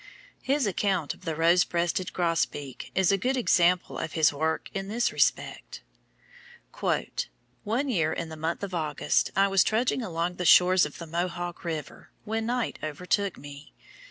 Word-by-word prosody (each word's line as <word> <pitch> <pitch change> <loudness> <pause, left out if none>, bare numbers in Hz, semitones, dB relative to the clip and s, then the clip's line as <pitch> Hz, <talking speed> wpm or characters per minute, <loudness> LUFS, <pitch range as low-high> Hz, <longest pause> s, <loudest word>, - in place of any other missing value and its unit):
His 275 -1 +1
account 190 -5 0
of - - -18
the 160 - -2
Rosebreasted 170 +2 +2
Grosbeak 165 -6 -2
is 190 -1 +3
a 195 - +2
good 255 +3 -1
sample 180 0 +3
of - - -4
his 155 -2 +3
work 160 +2 -2
in 195 0 -4
this 235 +4 0
respect: - - -1 1.0
"One 235 +7 -3
year, 165 - +1
in 165 0 -4
the 160 - -7
month 160 +4 -3
of 195 -2 -4
August, 155 -4 0
I 195 0 +4
was 195 -1 +4
trudging 240 +4 +1
along 175 -3 -2
the 180 - -2
shores 180 0 +6
of 145 - -12
the 170 - -7
Mohawk 175 +2 -3
river, 160 -3 -6
when 225 +1 -2
night 245 0 -2
overtook 180 +6 -1
me. 140 0 -11
175 Hz, 155 wpm, -27 LUFS, 160-200 Hz, 1.0 s, shores